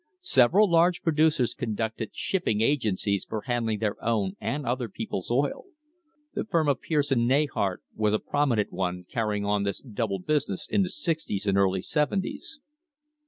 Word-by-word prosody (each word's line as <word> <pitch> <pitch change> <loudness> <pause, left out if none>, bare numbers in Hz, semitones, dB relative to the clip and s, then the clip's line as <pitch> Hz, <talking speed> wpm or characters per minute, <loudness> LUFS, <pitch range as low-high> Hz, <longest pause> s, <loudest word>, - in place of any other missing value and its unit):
Several 175 - +5
large 170 0 +3
producers 155 -6 +2
conducted 110 -2 -3
shipping 170 - -1
agencies 110 -6 +1
for 110 - -4
handling 115 -3 -1
their 105 -1 -2
own 105 -5 0
and 145 -1 -2
other 125 -1 -1
people's 95 -2 -5
oil. 135 +4 0 0.7
The - - -2
firm 165 -7 +1
of 140 - +1
Pierce 145 -3 0
and 120 -3 +3
Neyhart 130 -9 +1
was 105 -1 +1
a - - +3
prominent 125 -5 0
one 90 -1 -2
carrying 105 -3 -1
on 105 0 +1
this 100 -1 -2
double 110 -5 -3
business 140 -1 -1
in 205 - +2
the 185 - 0
sixties 160 - -2
and 100 -1 +2
early 95 -1 +2
seventies. 195 - -1
120 Hz, 160 wpm, -27 LUFS, 105-150 Hz, 0.7 s, Several